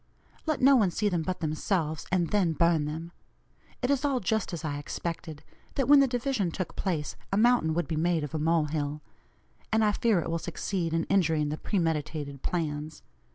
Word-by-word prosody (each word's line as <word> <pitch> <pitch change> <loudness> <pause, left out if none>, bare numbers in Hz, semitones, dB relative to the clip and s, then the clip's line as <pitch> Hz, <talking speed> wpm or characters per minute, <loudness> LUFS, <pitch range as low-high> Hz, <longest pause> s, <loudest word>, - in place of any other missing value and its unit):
Let 310 -3 0
no 275 +2 +7
one 210 -7 +4
see 205 +4 0
them 175 -4 0
but 180 +2 -3
themselves, 155 0 -1
and 175 -3 +1
then 190 -6 +2
burn 165 -1 +2
them. 160 +3 -5 0.7
It 250 - +2
is 275 -2 +1
all 275 -3 +1
just 220 +1 -1
as 165 -3 -5
I 145 -1 -2
expected 160 0 -5 0.3
that 270 - 0
when 290 0 +8
the 275 - +5
division 245 -6 0
took 180 +1 -5
place, 165 -6 -2 0.2
a 195 - +1
'mountain 225 -8 +3
would 175 - 0
be 160 - -2
made 165 -1 +1
of 150 - -5
a 155 - -1
mole 160 0 +2
hill.' 150 0 -3 0.7
And 220 0 +3
I 210 - +4
fear 215 -2 +2
it - - -3
will 165 - 0
succeed 170 +1 -3
in 165 - +1
injuring 160 -6 +2
the 150 - -3
premeditated 155 -7 -2
plans. 155 -3 -3
170 Hz, 200 wpm, -28 LUFS, 155-205 Hz, 0.7 s, when